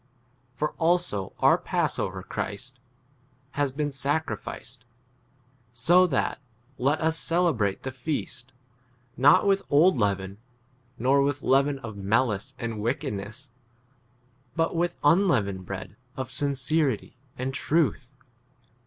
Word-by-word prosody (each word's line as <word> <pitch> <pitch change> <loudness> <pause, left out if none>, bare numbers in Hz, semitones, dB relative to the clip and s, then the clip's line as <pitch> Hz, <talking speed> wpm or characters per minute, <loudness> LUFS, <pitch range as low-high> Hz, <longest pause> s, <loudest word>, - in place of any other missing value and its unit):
For 150 +3 -1
also 165 - +1
our - - +5
passover, - - -1
8 - - -18
Christ, 125 +6 -5 0.7
has 145 -2 0
been 145 +2 -2
sacrificed; 140 -4 -2
x - - -30 0.9
so 180 +7 +5
that 145 -2 -1 0.4
let 140 +5 +2
us 160 0 +1
celebrate 160 - +1
the 130 - -3
feast, 130 -2 -5 0.6
not 140 +8 +5
with 195 -1 +3
old 155 +3 +5
leaven, 100 -1 -1 0.6
nor 135 +4 +3
with 145 0 -1
leaven 140 +1 +3
of 115 -6 -8
malice 110 +4 0
and 115 -3 -4
wickedness, 120 0 -4 1.0
but 165 +1 0
with 175 +1 0
unleavened 130 - +2
[bread] 100 0 -6 0.2
of 130 -2 -4
sincerity 140 -2 0 0.2
and 130 +1 -3
truth. 145 -4 0
135 Hz, 115 wpm, -26 LUFS, 115-155 Hz, 1.0 s, our